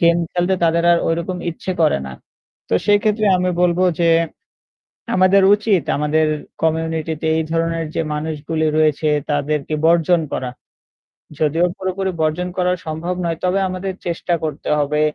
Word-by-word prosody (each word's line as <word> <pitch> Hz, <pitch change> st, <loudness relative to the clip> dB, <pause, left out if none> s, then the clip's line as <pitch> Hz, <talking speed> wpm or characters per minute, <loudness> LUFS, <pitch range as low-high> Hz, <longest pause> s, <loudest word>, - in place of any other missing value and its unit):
Game 170 Hz, 0 st, +4 dB
খেলতে 175 Hz, +2 st, +1 dB
তাদের 170 Hz, +1 st, +2 dB
আর 170 Hz, -, +4 dB
ঐরকম 170 Hz, +2 st, -2 dB
ইচ্ছে 170 Hz, +3 st, -6 dB
করে 155 Hz, -, +3 dB
না। 65 Hz, -, -7 dB, 0.6 s
তো -, -, 0 dB
সেই 205 Hz, 0 st, +5 dB
ক্ষেত্রে 215 Hz, -1 st, +1 dB
আমি 180 Hz, 0 st, 0 dB
বলবো 175 Hz, 0 st, +2 dB, 0.2 s
যে 170 Hz, -, +3 dB, 1.1 s
আমাদের 185 Hz, +1 st, +5 dB
উচিত 205 Hz, -4 st, +1 dB
আমাদের 150 Hz, +2 st, +1 dB, 0.4 s
কমিউনিটিতে 160 Hz, -1 st, -1 dB
এই 160 Hz, -, 0 dB
ধরনের 165 Hz, 0 st, -1 dB
যে -, -, 0 dB
মানুষগুলি 155 Hz, +1 st, -2 dB
রয়েছে 155 Hz, 0 st, +2 dB, 0.2 s
তাদেরকে 145 Hz, +1 st, -1 dB
বর্জন 170 Hz, +1 st, +4 dB
করা। 130 Hz, -1 st, -3 dB, 0.9 s
যদিও 160 Hz, +3 st, +2 dB
পুরোপুরি 190 Hz, 0 st, -2 dB
বর্জন 160 Hz, +3 st, 0 dB
করা 180 Hz, 0 st, +2 dB
সম্ভব 160 Hz, +3 st, -3 dB
নয়, 165 Hz, -1 st, -1 dB
তবে 185 Hz, +2 st, +1 dB
আমাদের 185 Hz, +1 st, -4 dB
চেষ্টা 175 Hz, 0 st, -2 dB
করতে 155 Hz, -1 st, -4 dB
হবে। 150 Hz, +1 st, 0 dB
165 Hz, 145 wpm, -19 LUFS, 155-180 Hz, 1.1 s, সেই